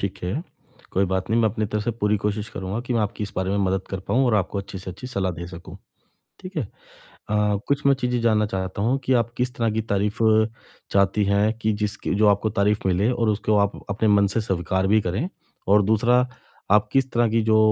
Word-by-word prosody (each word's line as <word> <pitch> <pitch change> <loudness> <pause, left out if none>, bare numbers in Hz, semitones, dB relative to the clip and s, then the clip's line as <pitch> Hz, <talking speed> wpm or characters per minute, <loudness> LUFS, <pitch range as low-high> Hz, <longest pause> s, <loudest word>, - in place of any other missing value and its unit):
ठीक 100 -1 -3
है। 120 - -2 0.5
कोई 95 - +2
बात 95 +1 -2
नहीं 115 +1 +3
मैं 110 - +4
अपनी 110 0 -2
तरफ़ 105 +1 -2
से - - +1
पूरी 105 -2 0
कोशिश 105 +1 -2
करूँगा 95 +3 -4
कि 125 - -1
मैं 115 - +2
आपकी 105 0 -2
इस 100 - -8
बारे 95 0 -1
में 100 - 0
मदद 95 0 0
कर 95 -1 -3
पाऊँ 130 +2 +3
और 115 - +2
आपको 100 0 0
अच्छी 100 0 -6
से 95 0 -7
अच्छी 100 +7 -9
सलाह 100 -7 -1
दे 85 +1 -7
सकूँ। 85 0 -10 0.6
ठीक 185 +1 -10
है? - - +2 0.7
अ, 105 -1 +2
कुछ 140 +1 0
मैं 140 - +6
चीज़ें 125 -1 0
जानना 110 -2 +2
चाहता 95 -1 -3
हूँ, 125 +5 +2
कि 130 - +1
आप 120 -2 +2
किस 125 0 -1
तरह 115 -2 0
की 110 - -1
तारीफ़ 105 +2 0 0.7
चाहती 100 +1 +3
हैं, 100 +2 +2
कि 110 -1 0
जिसकी 105 -2 -2
जो 105 +1 +3
आपको 105 +2 +2
तारीफ़ 105 +1 +3
मिले 95 +5 +2
और 115 -2 0
उसको 105 0 +1
आप 100 0 0
अपने 105 +2 +1
मन 100 -1 +5
से 115 - +2
स्वीकार 95 -1 -1
भी 110 +3 +4
करें। 100 - -2 0.4
और 105 +1 +5
दूसरा, 120 +5 +3 0.4
आप 105 0 +4
किस 135 -1 +2
तरह 120 0 +3
की 115 +1 +2
जो 110 0 +3
105 Hz, 230 wpm, -23 LUFS, 100-115 Hz, 0.7 s, मैं